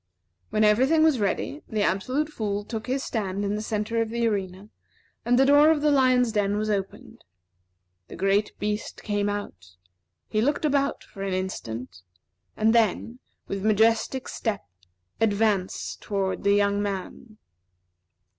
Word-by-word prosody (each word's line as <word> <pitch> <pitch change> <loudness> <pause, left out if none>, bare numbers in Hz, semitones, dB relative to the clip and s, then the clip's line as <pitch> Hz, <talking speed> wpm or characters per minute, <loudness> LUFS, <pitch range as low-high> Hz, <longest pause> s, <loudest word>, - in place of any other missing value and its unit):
When 215 - +1
every 215 +5 +4
thing 315 +1 +4
was 310 -6 +3
ready, 210 +8 -2
the 215 -2 0
Absolute 255 +12 0
Fool 205 -7 -3
took 225 +1 -6
his 265 +2 -1
stand 200 -3 -2
in 200 - -1
the 210 - -3
centre 220 +1 -1
of 225 - -2
the 235 0 0
arena, 195 -1 -3 0.5
and 245 +1 +2
the 270 - +5
door 290 +2 +6
of 315 -2 +2
the 300 - +4
lion's 255 -3 +3
den 205 -1 0
was 215 0 -1
opened. 195 -2 -5 0.8
The - - -10
great 195 +3 0
beast 210 +1 -4
came 205 -1 0
out, 95 - -6 0.5
he 215 - 0
looked 290 +5 0
about 280 -1 0
for 195 - -12
an 195 -1 -2
instant, 120 - -5 0.6
and 220 +1 +3
then, 230 +2 +1 0.3
with 195 -1 -4
majestic 220 +4 +2
step, 220 -4 -3 0.5
advanced 210 -3 0
toward 195 -2 -2
the 200 0 +4
young 200 0 +2
man. 205 +2 -5
215 Hz, 155 wpm, -25 LUFS, 200-245 Hz, 0.8 s, door